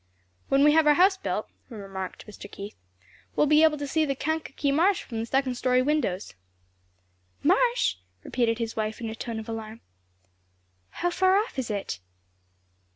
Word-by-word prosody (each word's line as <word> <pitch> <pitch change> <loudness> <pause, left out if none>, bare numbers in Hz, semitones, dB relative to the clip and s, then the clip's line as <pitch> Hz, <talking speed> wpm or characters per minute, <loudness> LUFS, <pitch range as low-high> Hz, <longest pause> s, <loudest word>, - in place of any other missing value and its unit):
"When 275 +1 +4
we 300 - +7
have 315 0 +4
our 295 - +6
house 380 +4 +5
built," 380 - -3 0.2
remarked 195 -5 -7
Mr. 205 -1 -11
Keith, 200 +1 -8 0.6
"we'll - - +4
be 300 +1 +5
able 315 -1 +5
to 290 - -4
see 315 +3 +1
the 275 -3 0
Kankakee 300 -1 -2
Marsh 350 +7 +3
from 225 -3 -6
the 225 - -3
second 265 0 +1
story 255 +1 +2
windows." 265 -10 -1 1.1
"Marsh?" 470 - +3 0.3
repeated 230 -2 0
his 230 -1 -3
wife 215 0 -2
in 230 -2 -4
a - - -5
tone 230 0 -5
of 220 - -6
alarm, 225 0 -6 1.1
"how 350 0 -2
far 375 +2 +3
off 420 - -1
is 245 - -3
it?" 200 - -3
270 Hz, 165 wpm, -26 LUFS, 225-315 Hz, 1.1 s, we